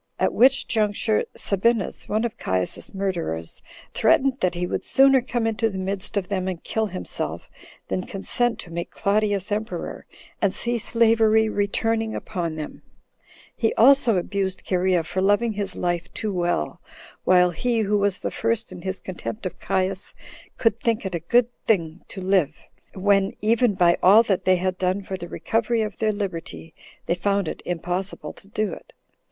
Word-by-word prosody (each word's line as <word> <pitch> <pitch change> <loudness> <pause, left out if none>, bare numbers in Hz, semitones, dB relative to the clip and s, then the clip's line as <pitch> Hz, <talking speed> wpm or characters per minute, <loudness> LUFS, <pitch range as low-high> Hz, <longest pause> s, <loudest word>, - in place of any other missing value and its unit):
At - - +1
which 265 +2 +4
juncture 215 0 +1
Sabinus, 210 +1 0
one 215 +2 +1
of 230 - -3
Caius's 95 -1 -3
murderers, 170 - -3 0.3
threatened 265 0 +3
that 180 -1 0
he 175 +1 -1
would - - -3
sooner 270 -1 +5
come 240 -2 -2
into 225 0 +1
the 195 - -6
midst 190 +1 -2
of 190 -2 -1
them 185 -2 -2
and 180 -3 -4
kill 220 -1 -1
himself, 185 -2 -5 0.4
than 185 - -3
consent 240 +5 0
to 170 - -12
make 170 +1 -4
Claudius 205 -1 0
emperor, 215 +2 -4 0.3
and 200 -2 +2
see 235 0 -1
slavery 220 -1 +3
returning 220 +2 0
upon 170 -6 -3
them; 155 -1 -7 0.7
he 225 - 0
also 250 -3 +5
abused 190 +1 -2
Cherea 180 -2 +2
for 175 +4 -2
loving 205 +4 +2
his 200 -2 -3
life 175 -1 -2
too 215 -2 -2
well, 175 - -1 0.4
while 180 -1 +5
he 230 +7 0
who 205 0 +1
was 200 -1 0
the - - -2
first 230 -1 -1
in 180 -1 -9
his 190 +1 -3
contempt 190 +3 -6
of 180 -1 -5
Caius, 190 +1 -2 0.4
could 225 -1 +2
think 230 -3 0
it 190 - -3
a 170 - -1
good 235 +9 +3 0.2
thin 170 -5 +1
to 190 - -8
live, 185 -5 +2 0.4
when, 195 0 +2
even 225 0 +2
by 175 -2 +4
all 205 +5 +7
that 195 -5 -1
they 185 - +5
had 185 0 -2
done 185 +2 0
for 190 - -5
the 175 -2 -7
recovery 225 +3 0
of 210 -3 -6
their 220 -1 +2
liberty, 175 -5 -5 0.3
they - - +1
found 200 +1 0
it - - -5
impossible 175 -2 -3
to - - -16
do 215 0 -2
it. - - -12
200 Hz, 170 wpm, -24 LUFS, 180-220 Hz, 0.7 s, all